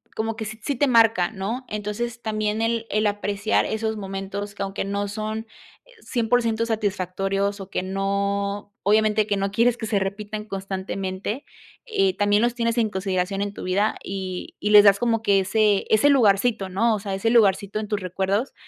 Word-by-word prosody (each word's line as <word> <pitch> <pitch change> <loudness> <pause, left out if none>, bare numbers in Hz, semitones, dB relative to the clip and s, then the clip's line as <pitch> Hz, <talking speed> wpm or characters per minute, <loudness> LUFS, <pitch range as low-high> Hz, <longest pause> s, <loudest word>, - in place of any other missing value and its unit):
como 225 0 -2
que 220 - -4
sí 215 +1 -7
sí 285 - -1
te 285 +3 +2
marca, 225 -7 +4
¿no?, 225 +5 -4
entonces 215 +3 -4
también 215 -1 -1
el 230 0 0
el 215 +1 +1
apreciar 205 +1 0
esos 220 0 -2
momentos 195 +1 -5
que 200 - -3
aunque 195 0 -3
no 200 +1 -2
son 215 +2 -4 0.6
100% 230 -1 +1
satisfactorios 200 -2 -1
o 195 -1 -8
que 185 - -2
no 200 +1 -2
obviamente 215 +1 +3
que 205 - +1
no 195 0 -1
quieres 235 +3 +3
que 220 - -5
se 210 -2 +1
repitan 205 +2 -4
constantemente, 195 +3 -4 0.4
eh, 390 -5 +1
también 205 0 +3
los 240 0 +1
tienes 230 0 0
en 225 -2 +2
consideración 190 0 -2
en 205 0 -2
tu - - -8
vida 195 +4 +1
y 190 -1 -5
y 210 - 0
les 210 0 +9
das 200 -1 +6
como 230 -2 +1
que 200 -3 +3
ese 205 +1 +2
ese 220 +6 +4
lugarcito, 215 -5 +3
¿no?, 220 +5 +2
o - - -4
sea, 200 -1 -5
ese 195 +4 0
lugarcito 205 -3 +3
en 215 -1 -5
tus 210 - 0
recuerdos 195 +6 -1
205 Hz, 185 wpm, -23 LUFS, 195-225 Hz, 0.6 s, les